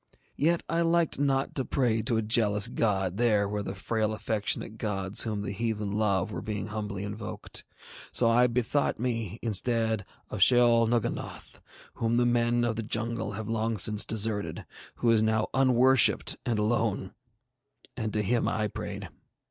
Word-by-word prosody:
Yet 165 +3 +1
I 165 0 0
liked 170 -3 +1
not 135 -1 0
to 130 - -1
pray 120 -4 0
to 115 +1 0
a 110 - 0
jealous 105 -2 +2
God 95 -4 -1
there 110 -4 +2
where 105 +1 -3
the 95 -1 -5
frail 110 +2 -1
affectionate 110 0 -3
gods 100 -1 0
whom 105 -2 -3
the 100 - -4
heathen 105 -1 -2
love 100 -2 0
were - - -5
being 105 -1 -4
humbly 105 -2 -4
invoked; 105 +2 -6 0.5
so 120 - +3
I 120 +2 +4
bethought 125 +4 0
me, 115 -4 -3
instead, 110 0 +1 0.3
of 105 - -4
Sheol 120 0 +5
Nugganoth, 120 -1 -3 0.3
whom 115 +1 0
the 120 - +3
men 120 0 +2
of 115 -2 -1
the - - -1
jungle 110 +1 -2
have 110 +1 -5
long 115 0 -1
since 105 +2 +3
deserted, 105 -5 -1 0.3
who 120 - +2
is 110 -1 +4
now 110 0 +1
unworshipped 130 -1 +4
and 115 -3 +1
alone; 105 -3 0 0.8
and 110 -3 -3
to 105 - 0
him 120 +4 +1
I 105 -1 -1
prayed. - - -6
110 Hz, 165 wpm, -28 LUFS, 105-120 Hz, 0.8 s, Sheol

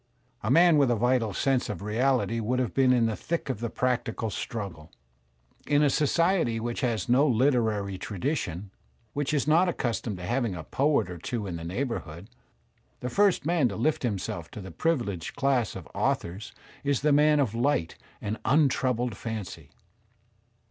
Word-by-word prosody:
A 105 - -2
man 165 +2 +6
with 140 -3 +4
a 120 - +3
vital 120 -1 +1
sense 135 +3 0
of 100 -2 -5
reality 115 +2 +1
would 115 +3 -1
have 125 -3 -1
been 130 -1 +4
in 120 -2 +4
the 110 -1 0
thick 165 0 -3
of 110 - -6
the 115 0 -3
practical 120 -3 -1
struggle. 95 -8 -6 0.8
In 145 0 +3
a 145 - +4
society 165 -5 +2
which 120 +2 -3
has 120 -4 -1
no 130 +5 +4
literary 110 -7 +1
tradition, 100 - -3 0.4
which 145 0 -1
is 145 -1 0
not 170 +4 +4
accustomed 115 - -2
to 90 - -7
having 120 -1 -1
a 85 - -6
poet 140 - +1
or 90 -2 -7
two 115 +4 -3
in 90 -3 -4
the 85 - -8
neighbourhood, 95 - -4 0.7
the 125 - -3
first 200 -4 +3
man 160 -6 +2
to 100 - -5
lift 145 +9 0
himself 95 -7 -3
to - - -9
the 95 -1 -8
privileged 120 - -2
class 135 -5 +1
of 95 -5 -8
authors 95 +6 -2 0.3
is 140 -2 +1
the 150 +1 +3
man 150 +1 +5
of 125 -7 +1
light 120 - 0 0.3
and 105 +2 -4
un 145 +1 +4
troubled 125 -3 -1
fancy. 100 -9 -6
120 Hz, 175 wpm, -27 LUFS, 105-140 Hz, 0.8 s, man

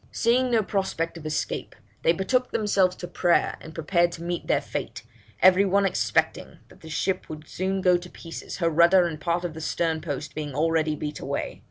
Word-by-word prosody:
Seeing 250 +2 +2
no 230 -3 +3
prospect 190 -5 -2
of 155 - -7
escape, 155 - -3 0.3
they 165 - +4
betook 250 +9 0
themselves 195 -4 +2
to 175 - -7
prayer, 175 -1 +2
and 160 0 -11
prepared 170 +2 +2
to 165 - -8
meet 175 0 -3
their - - +3
fate, 115 0 -6 0.4
every 185 +1 +7
one 200 0 +2
expecting 195 - 0
that - - -19
the 160 - -11
ship 185 +4 -2
would 155 0 -8
soon 190 +1 -2
go 180 -1 +4
to 175 0 -10
pieces, 165 -2 -8
her 170 -3 +1
rudder 170 +3 +5
and 160 -3 -4
part 175 +1 0
of 170 - -4
the 160 - -8
stern 160 0 -1
post 150 -1 -5
being 150 -3 -5
already 160 0 +1
beat 150 0 -5
away.' - - -4
170 Hz, 200 wpm, -25 LUFS, 160-190 Hz, 0.4 s, every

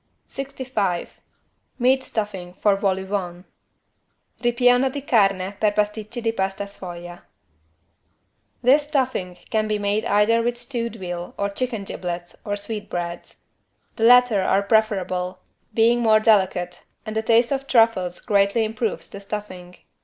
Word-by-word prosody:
65 255 -9 -3 0.6
MEAT 260 +2 +3
STUFFING 195 -7 -4
FOR 205 +1 +3
VOL 195 -1 0
AU - - -7
VENT 185 -2 -4 1.0
(Ripieno 245 +2 +3
di 285 +1 -5
carne 195 -7 +2
per 210 -1 +2
pasticcini 215 +3 -2
di 225 - +2
pasta 195 -1 -2
sfoglia) 175 -3 -9 1.4
This 285 +4 +4
stuffing 255 - -1
can 215 -1 +1
be 215 0 0
made 205 +1 0
either 210 +3 +3
with 240 +1 -1
stewed 235 -2 -4
veal 175 -3 -6
or 200 0 -1
chicken 235 -1 -3
giblets 175 -2 -6
or 205 - -2
sweetbreads. 200 -5 -5 0.6
The 225 - +2
latter 245 -4 +6
are 190 +1 +2
preferable, 185 -4 0 0.3
being 235 +1 +4
more 220 -2 +5
delicate 190 -5 +1 0.2
and 215 - -5
a 220 - +1
taste 230 +2 +3
of 275 0 -2
truffles 225 -8 +2
greatly 200 +2 +2
improves 220 +1 -3
the 200 - -10
stuffing. 185 -3 -7
210 Hz, 135 wpm, -23 LUFS, 190-235 Hz, 1.4 s, latter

